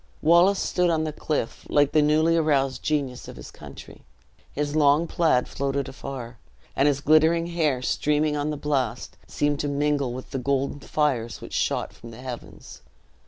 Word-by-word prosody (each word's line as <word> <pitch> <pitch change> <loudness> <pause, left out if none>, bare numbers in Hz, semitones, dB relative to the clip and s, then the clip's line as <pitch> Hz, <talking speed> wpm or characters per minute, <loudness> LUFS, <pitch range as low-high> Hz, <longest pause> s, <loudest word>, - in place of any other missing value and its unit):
Wallace 170 +5 +5
stood 180 -1 +1
on 160 -2 +1
the 155 -1 -3
cliff, 150 -6 -3
like 145 -1 +3
the 155 - +4
newly 155 +2 +3
aroused 140 -5 +1
genius 140 -5 -2
of - - -9
his - - -11
country; - - -12 0.5
his 145 +1 -3
long 150 +1 +4
plaid 160 -7 +1
floated 140 0 -2
afar, 125 -4 -8 0.4
and 140 - +3
his 140 -1 +1
glittering 160 +3 +4
hair 155 -7 0
streaming 150 +3 +1
on 145 +1 -1
the 150 - -3
blast, 130 -6 -2
seemed 145 -1 -1
to 145 - -1
mingle 145 -2 0
with 130 +1 -8
the 135 - -2
golden 140 +2 -1
fires 135 -6 -1
which - - -10
shot - - -1
from 115 - -12
the 115 - -11
heavens. 125 - -9
145 Hz, 170 wpm, -25 LUFS, 135-155 Hz, 0.5 s, Wallace